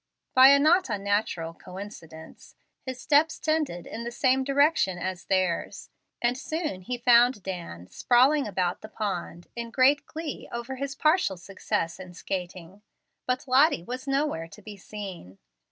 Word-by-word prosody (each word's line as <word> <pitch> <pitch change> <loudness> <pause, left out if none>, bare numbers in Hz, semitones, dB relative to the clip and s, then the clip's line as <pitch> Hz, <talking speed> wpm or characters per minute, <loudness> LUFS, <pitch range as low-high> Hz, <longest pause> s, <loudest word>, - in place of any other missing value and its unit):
By 260 +1 +9
a 280 +1 +8
not 320 +3 +3
unnatural 200 -5 -1
coincidence, 180 -4 -11 0.3
his 260 -1 -5
steps 300 +4 +3
tended 310 - -1
in 230 - -6
the 235 - -4
same 260 +2 +2
direction 280 - +2
as 185 0 -5
theirs, 185 -3 -1 0.3
and 240 +1 +2
soon 310 - -4
he 245 +7 -4
found 240 -3 +4
Dan 170 - -6
sprawling 260 - +3
about 180 -3 -1
the 215 - -10
pond 175 -5 -4
in 235 -1 -5
great 275 +4 +3
glee 320 -2 -6
over 235 +3 -5
his 275 +1 -4
partial 310 - +2
success 175 -1 -3
in 180 -1 -10
skating; 185 +1 -6 0.5
but 255 +2 -1
Lottie 265 - +4
was 255 +7 -6
nowhere 275 - -1
to 210 - -14
be 210 0 -9
seen. 190 - -9
230 Hz, 150 wpm, -27 LUFS, 185-275 Hz, 0.5 s, By